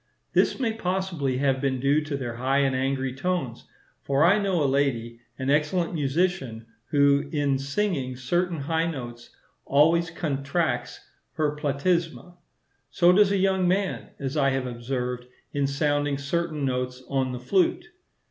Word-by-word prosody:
This - - +2
may 230 -4 0
possibly 180 -10 -2
have 135 -1 +1
been 135 -2 0
due 140 +4 +2
to 145 -2 -3
their 120 -3 -5
high 130 +3 +1
and 135 -2 +1
angry 135 0 -1
tones; 135 -5 -3 0.3
for 140 +2 +1
I 200 +5 +5
know 190 -6 +1
a - - +2
lady, 130 -4 0 0.2
an 130 +1 -1
excellent 155 +4 +1
musician, 145 -6 -1 0.2
who, 140 0 +3
in 145 -3 +1
singing 140 -2 -1
certain 170 +5 -1
high 160 +3 0
notes, 120 -6 -7 0.3
always 165 +4 +3
contracts 140 -5 -2 0.3
her 150 -2 0
platysma. 165 +4 -1 0.5
So 175 0 +4
does 200 +1 +5
a 200 - +2
young 190 -1 +2
man, 190 +1 -1
as 135 +1 -4
I 140 -2 +3
have 135 -1 -1
observed, 125 0 -4 0.3
in 140 -1 +1
sounding 145 0 0
certain 155 +1 -2
notes 125 0 -2
on 135 -1 0
the 125 - -5
flute. 185 - +1
140 Hz, 150 wpm, -25 LUFS, 130-170 Hz, 0.5 s, I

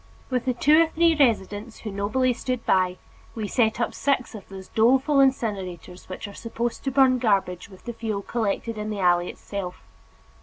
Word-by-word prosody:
With 250 -1 0
the 255 -1 0
two 300 +6 +5
or 330 - +4
three 330 +1 +3
residents 220 -5 0
who 215 - -5
nobly 215 +6 +1
stood 250 0 -4
by, 185 -1 +2 0.4
we 220 -2 -3
set 220 0 +1
up 240 - -1
six 275 -3 0
of 210 -4 -10
those 190 -1 -10
doleful 265 +6 +3
incinerators 195 -10 -1
which 185 +3 -6
are 200 - -10
supposed 235 +1 -4
to - - +2
burn 260 -1 +4
garbage 195 -5 0
with 190 -2 -15
the 240 - -4
fuel 220 -3 -3
collected 225 0 -2
in 210 0 -3
the 210 -2 -4
alley 175 -1 +3
itself. 185 -3 -6
225 Hz, 185 wpm, -25 LUFS, 195-255 Hz, 0.4 s, two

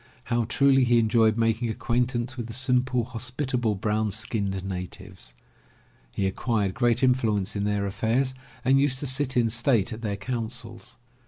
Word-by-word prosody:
How 120 -2 0
truly 135 +2 +3
he 120 -1 +3
enjoyed 110 -1 +3
making 115 +1 +1
acquaintance 120 +2 -1
with 120 -3 -5
the 115 - -7
simple, 125 0 +1
hospitable, 125 -1 -2
brown 105 +2 0
skinned 100 -2 -2
natives. 90 -6 -7 0.8
He 95 - -2
acquired 100 0 0
great 120 +1 +1
influence 110 -6 +1
in 100 0 -1
their 105 -1 0
affairs 115 +6 0 0.3
and 135 +1 +4
used 140 -2 +1
to - - -2
sit 130 0 +1
in 115 -2 +3
state 115 -2 +2
at 110 - -8
their 105 -3 -2
councils. 115 +2 -5
115 Hz, 155 wpm, -26 LUFS, 105-125 Hz, 0.8 s, and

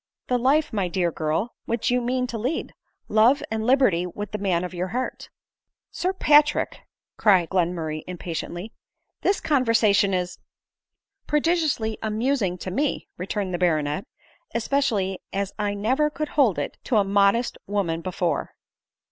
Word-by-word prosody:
" - - -62
The 250 -1 +2
life, 280 +4 +2
my 200 -4 0
dear 175 0 0
girl, 160 +9 -1
which 235 +1 0
you 250 0 +2
mean 250 +1 0
to 235 -2 -5
lead; 255 +9 -2 0.3
love 230 +7 +4
and 220 0 -1
liberty 245 -10 +3
with 205 +3 -6
the 210 - -3
man 185 -3 +1
of 180 - -5
your 180 +1 -2
heart." 250 +7 -4 0.3
" - - -68 0.3
Sir 365 - -1
Patrick," 295 -5 +3 0.4
cried 185 -6 +4
Glenmurray 165 -4 -1
impatiently, 175 +3 -5 0.2
" - - -54
this 395 - +2
conversation 225 -8 +3
is 180 -1 -2 0.3
" - - -65
" 395 0 -57
Prodigiously 300 -8 +1
amusing 220 -3 0
to 185 - -6
me," 280 +9 -1
returned 190 +1 -3
the 175 - -1
baronet, 160 - 0 0.3
" - - -33
especially 225 -6 0
as 200 0 -2
I 205 -1 0
never 260 +9 +1
could 305 0 -4
hold 260 - +3
it - - -4
to 240 - +2
a 205 - +5
modest 200 +4 +2
woman 185 -5 -1
before." 180 -1 -2
210 Hz, 165 wpm, -24 LUFS, 180-255 Hz, 0.4 s, a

